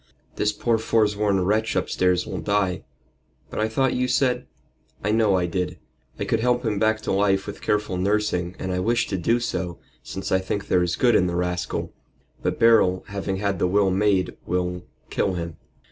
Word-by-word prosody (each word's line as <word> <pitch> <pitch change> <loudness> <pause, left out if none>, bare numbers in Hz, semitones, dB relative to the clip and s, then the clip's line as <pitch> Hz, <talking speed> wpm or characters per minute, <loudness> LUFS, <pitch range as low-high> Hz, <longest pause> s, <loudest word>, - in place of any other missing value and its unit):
This 105 - +1
poor 115 +2 0
foresworn 105 -4 +2
wretch 110 +3 +1
upstairs 90 -1 +1
will 95 -3 -4
die." 100 -3 0 0.7
"But - - -4
I 110 - +2
thought 130 +3 +1
you 125 0 0
said 125 - +1 0.2
" 65 0 -33
"I 105 - +1
know 110 -3 +3
I 90 -1 +1
did. 90 +1 -2 0.4
I - - -1
could - - +1
help 125 +1 +1
him 105 -3 0
back 110 0 +2
to - - -2
life 95 0 +2
with 100 - -8
careful 105 -3 0
nursing, 95 -2 0
and 95 - -4
I 90 - -1
wish 120 +5 +1
to 95 - -1
do 115 +8 +2
so, 90 -7 -3 0.2
since 95 - -6
I 95 - +4
think 100 +2 -4
there 90 - +4
is 90 0 0
good 120 -2 +3
in 90 -4 +4
the 85 - -2
rascal. 90 0 -2 0.5
But - - -1
Beryl, 110 -5 +4
having 95 -1 -3
had 100 -2 -1
the - - +2
will 95 +1 +3
made, 95 -1 +1
will 90 0 -2 0.2
kill 95 - 0
him. 85 -2 -5
100 Hz, 195 wpm, -24 LUFS, 90-110 Hz, 0.7 s, I